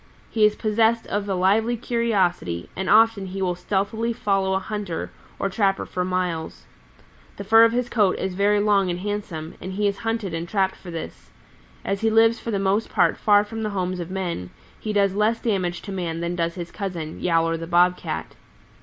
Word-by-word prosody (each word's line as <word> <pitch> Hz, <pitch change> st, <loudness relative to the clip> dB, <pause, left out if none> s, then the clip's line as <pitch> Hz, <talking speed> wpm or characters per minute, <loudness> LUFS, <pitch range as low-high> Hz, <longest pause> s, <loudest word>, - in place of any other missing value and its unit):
He 220 Hz, -2 st, +4 dB
is 210 Hz, -, -2 dB
possessed 225 Hz, +1 st, +2 dB
of 205 Hz, 0 st, -3 dB
a 195 Hz, -, 0 dB
lively 215 Hz, +6 st, +2 dB
curiosity, 195 Hz, -, 0 dB
and 190 Hz, 0 st, -3 dB
often 220 Hz, -2 st, +4 dB
he 190 Hz, +1 st, -6 dB
will 180 Hz, -1 st, +1 dB
stealthily 205 Hz, +5 st, -1 dB
follow 195 Hz, -3 st, 0 dB
a -, -, +1 dB
hunter 200 Hz, -3 st, -4 dB, 0.3 s
or -, -, -1 dB
trapper 195 Hz, 0 st, 0 dB
for 180 Hz, -, -3 dB
miles. 180 Hz, -3 st, -3 dB, 0.7 s
The 200 Hz, -, -5 dB
fur 225 Hz, +3 st, +7 dB
of 230 Hz, -, +3 dB
his 245 Hz, +1 st, 0 dB
coat 210 Hz, -6 st, +2 dB
is 190 Hz, -1 st, -3 dB
very 205 Hz, +2 st, +2 dB
long 205 Hz, -2 st, +3 dB
and 175 Hz, 0 st, -3 dB
handsome, 195 Hz, -6 st, -4 dB
and 185 Hz, +1 st, -6 dB
he 205 Hz, +2 st, +1 dB
is 200 Hz, -1 st, -1 dB
hunted 225 Hz, -5 st, -2 dB
and 165 Hz, +1 st, -4 dB
trapped 190 Hz, -1 st, +1 dB
for 180 Hz, -, -12 dB
this. 165 Hz, -1 st, -7 dB, 0.6 s
As 195 Hz, 0 st, -1 dB
he 225 Hz, -, +3 dB
lives 225 Hz, +1 st, +4 dB
for -, -, -6 dB
the 210 Hz, -, 0 dB
most 195 Hz, +3 st, 0 dB
part -, -, +3 dB
far 205 Hz, -1 st, +4 dB
from 225 Hz, +1 st, -6 dB
the 215 Hz, -, -1 dB
homes 185 Hz, -2 st, -2 dB
of 170 Hz, 0 st, -5 dB
men, 175 Hz, -, -3 dB, 0.3 s
he 215 Hz, -, -3 dB
does 200 Hz, -2 st, +2 dB
less 215 Hz, +3 st, +1 dB
damage 185 Hz, -6 st, -1 dB
to 200 Hz, -, -7 dB
man 170 Hz, -4 st, -3 dB
than 170 Hz, +1 st, -2 dB
does 170 Hz, -1 st, -1 dB
his 175 Hz, -2 st, -6 dB
cousin, 175 Hz, -6 st, -5 dB
Yowler 165 Hz, -1 st, +2 dB
the 165 Hz, 0 st, -6 dB
Bob 175 Hz, +1 st, +4 dB
Cat. 80 Hz, -, -5 dB
195 Hz, 205 wpm, -23 LUFS, 180-215 Hz, 0.7 s, fur